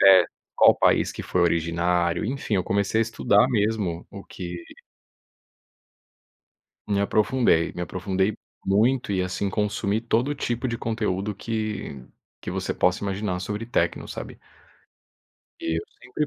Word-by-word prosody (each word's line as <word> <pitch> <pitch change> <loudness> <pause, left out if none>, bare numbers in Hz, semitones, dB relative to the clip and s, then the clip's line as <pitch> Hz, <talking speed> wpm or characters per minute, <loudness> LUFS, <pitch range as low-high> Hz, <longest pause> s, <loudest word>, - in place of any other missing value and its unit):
até 95 -2 +8 0.3
qual - - +7
país - - +3
que - - -6
foi 90 - 0
originário, 85 +1 +1
enfim, 125 -2 -2
eu 95 -2 +1
comecei 100 +3 +1
a - - +5
estudar 115 0 +3
mesmo, 105 -7 0
o 100 -1 -9
que 90 -2 -7 2.3
me 100 -1 +1
aprofundei, 105 -4 +2
me 90 - -5
aprofundei 95 +3 -1 0.3
muito 110 +5 +2
e 95 -2 +1
assim 90 +2 -2
consumi 105 +1 -1
todo 120 +5 +1
tipo 120 -1 -2
de 115 - -2
conteúdo 105 -3 -2
que 110 - -4 0.4
que - - -4
você - - -2
possa 90 - +2
imaginar 100 -2 -2
sobre 105 +3 -4
techno, 120 - 0
sabe. - - -7 1.2
E 80 0 -1
eu - - -4 0.2
sempre 140 +5 -2
100 Hz, 135 wpm, -25 LUFS, 90-110 Hz, 2.3 s, até